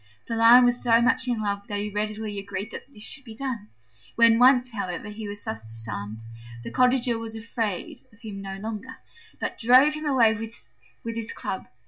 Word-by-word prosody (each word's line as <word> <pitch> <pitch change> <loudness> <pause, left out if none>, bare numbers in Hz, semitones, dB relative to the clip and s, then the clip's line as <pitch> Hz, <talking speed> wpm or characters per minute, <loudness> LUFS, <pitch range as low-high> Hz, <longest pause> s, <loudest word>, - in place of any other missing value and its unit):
The 230 - -3
Lion 235 +2 +8
was 245 0 +2
so 230 -2 +5
much 245 +2 +2
in 235 -3 -1
love 200 -1 -2
that 205 - -3
he 205 +1 -3
readily 210 0 -3
agreed 200 +2 -5
that 280 - -9
this 210 -5 -9
should 275 - -6
be 225 -3 -11
done. 235 -4 -4 0.5
When 230 -1 +6
once, 250 0 +5
however, 200 -3 -4
he 210 0 -7
was 205 0 -8
thus 110 - -5
disarmed, 110 -1 -7 0.4
the - - -6
Cottager 250 -2 +2
was 225 -1 -6
afraid 220 -3 -4
of 220 - -22
him 210 -4 -7
no 195 0 -6
longer, 220 +5 -6 0.4
but - - -4
drove 255 +5 +6
him 305 0 -4
away 240 -6 +4
with 130 - -9
his 230 -1 -4
club. 190 - -5
220 Hz, 190 wpm, -25 LUFS, 200-240 Hz, 0.5 s, Lion